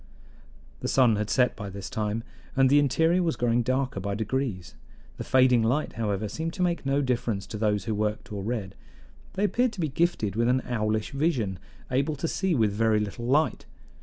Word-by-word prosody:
The - - -3
sun 125 -5 +4
had 105 0 -2
set 125 -2 +2
by 100 -2 -6
this 100 0 -7
time, 110 +1 -2 0.3
and 135 -1 +4
the 145 - +6
interior 160 +6 +3
was 165 -3 0
growing 120 0 +1
darker 130 -2 -1
by 100 +1 -3
degrees; 110 -4 -3 0.4
the - - -4
fading 130 -2 +4
light, 125 +7 0
however, 105 -2 -2
seemed 160 +10 -4
to 185 - -1
make 170 -5 -1
no 140 +1 +2
difference 120 -6 -1
to 110 - -6
those 105 -2 +1
who 110 - -1
worked 105 0 -2
or 100 - -4
read. 105 -3 -3 0.6
They 195 - -1
appeared 240 +3 +2
to 205 - -10
be 160 -3 0
gifted 135 - 0
with 115 +1 +2
an 130 +1 +2
owlish 110 -2 -1
vision, 135 - 0 0.3
able 140 +4 +1
to 155 +4 -3
see 190 0 0
with 110 -5 +2
very 110 +1 +2
little 105 +3 -4
light. 150 +5 +1
120 Hz, 195 wpm, -27 LUFS, 105-145 Hz, 0.6 s, the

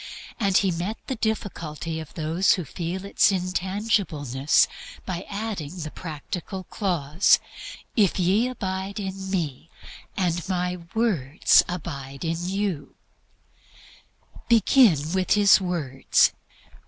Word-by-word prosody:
And 195 -4 +3
He 195 -2 +2
partly 170 +1 -2
met 220 +1 -4
the 260 - -3
difficulty 165 -8 -3
of 160 - -10
those 165 +4 +2
who 180 - -3
feel 175 +6 -5
its 200 - +3
intangibleness 180 - +1 0.4
by 180 -1 -5
adding 200 -6 -4
the 155 -3 -5
practical 180 +4 -6
clause, 170 -3 +2 0.6
"If 205 -5 +3
ye 195 +7 +3
abide 195 -4 -4
in 190 -1 -5
Me, 165 -5 -3 0.5
and 175 -2 0
My 180 -1 -1 0.2
words 175 - +3
abide 140 -5 -6
in 165 +2 -2
you." 195 -7 -3 1.5
Begin 210 - +4
with 185 -1 +2
His 205 -1 +6
words. 155 -8 +2
180 Hz, 115 wpm, -25 LUFS, 160-200 Hz, 1.5 s, His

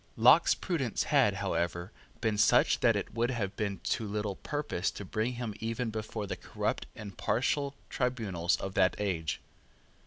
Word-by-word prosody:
Locke's 125 +9 +6
prudence 140 - -1
had, - - +3
however, 85 +3 -2 0.3
been 110 -2 +1
such 105 - +4
that - - +4
it - - -3
would 120 +1 +1
have 110 -6 -2
been 100 -3 -2
to 110 - -1
little 105 -1 -2
purpose 145 - -2
to 100 - -7
bring 110 +6 -1
him 120 -3 -4
even 115 +1 -2
before 110 -1 -4
the - - -3
corrupt - - -3
and 105 -3 -8
partial 140 +3 0
tribunals 105 -9 0
of 95 - -5
that 95 -1 +3
age. 85 -7 -2
110 Hz, 160 wpm, -31 LUFS, 100-120 Hz, 0.3 s, Locke's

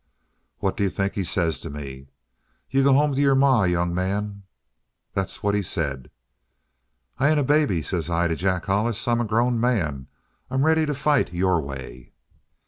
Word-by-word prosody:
"What 95 - -1
do 110 - -4
you 100 - +2
think 100 +2 -2
he 100 - -2
says 85 -4 0
to - - -7
me? 70 -2 -8 0.6
'You 135 0 +3
go 140 0 +5
home 145 +1 +3
to 135 - 0
your 140 -1 +4
ma, 135 -6 +4
young 90 0 0
man!' 100 +3 -2 0.7
"That's 95 +3 -3
what 100 0 +1
he 105 - +1
said. 70 -8 -3 1.1
"'I 140 - +3
ain't 155 -1 +3
a - - +1
baby,' 140 - +2
says 85 +2 -2
I 85 0 +1
to 85 - -1
Jack 90 +1 -1
Hollis. 110 +4 0
'I'm 120 0 +2
a - - -1
grown 120 +2 +1
man. 80 - 0 0.4
I'm 135 +2 +1
ready 160 -1 +3
to 150 - -1
fight 145 - +1
your 90 -1 +2
way.' 65 -3 -9
100 Hz, 185 wpm, -24 LUFS, 85-130 Hz, 1.1 s, go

